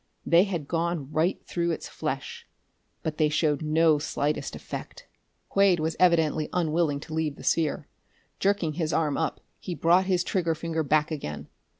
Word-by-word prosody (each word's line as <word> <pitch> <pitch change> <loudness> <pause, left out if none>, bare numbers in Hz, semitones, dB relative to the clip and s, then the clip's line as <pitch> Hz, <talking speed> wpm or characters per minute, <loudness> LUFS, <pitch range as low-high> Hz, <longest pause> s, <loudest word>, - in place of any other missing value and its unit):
They 170 +3 +5
had 170 -8 -4
gone 165 -4 -2
right 160 +5 +1
through 170 -1 -1
its 165 - -3
flesh 470 0 -5 0.6
but 160 -2 -3
they 155 -1 +4
showed 150 -1 +1
no 155 0 +3
slightest 145 -1 -2
effect! - - -8 0.4
Quade 195 -3 +3
was 160 +1 -1
evidently 160 -4 +3
unwilling 160 -4 +1
to 155 - -9
leave 155 -2 -1
the - - -12
sphere. 150 -3 0 0.5
Jerking 195 -5 +1
his 160 -1 -2
arm 150 -3 +1
up 160 - -2 0.2
he 180 - -5
brought 180 +3 +3
his 180 -2 +2
trigger 170 -3 0
finger 160 0 -2
back 155 +1 +2
again. 105 - -5
160 Hz, 165 wpm, -27 LUFS, 150-175 Hz, 0.6 s, They